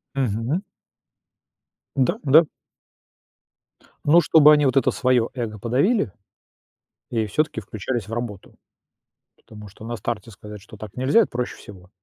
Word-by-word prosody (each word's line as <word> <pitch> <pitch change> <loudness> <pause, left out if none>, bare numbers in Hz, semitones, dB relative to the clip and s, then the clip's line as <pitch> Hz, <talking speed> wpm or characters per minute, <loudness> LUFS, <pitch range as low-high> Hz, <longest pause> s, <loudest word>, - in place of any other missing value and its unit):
Мгм. 125 - -1 1.4
Да, 130 -2 +1
да. 155 +4 +6 1.6
Ну 165 +4 +6
чтобы 150 -1 +6
они 150 -1 +3
вот 135 +1 +2
это - - +3
свое 125 -3 +1
эго 110 -5 -5
подавили 135 - +1 1.0
и 110 -2 -1
всё-таки 150 +3 -1
включались 110 +1 -5
в - - -8
работу. 115 -5 -6 0.8
Потому 105 -1 -13
что 105 +2 -15
на 120 +1 -4
старте 115 0 -5
сказать, 105 0 -11
что 105 +1 -14
так 105 -2 -10
нельзя- 130 - +3
это - - -1
проще 125 0 -4
всего. 95 -2 -14
120 Hz, 135 wpm, -22 LUFS, 105-135 Hz, 1.6 s, да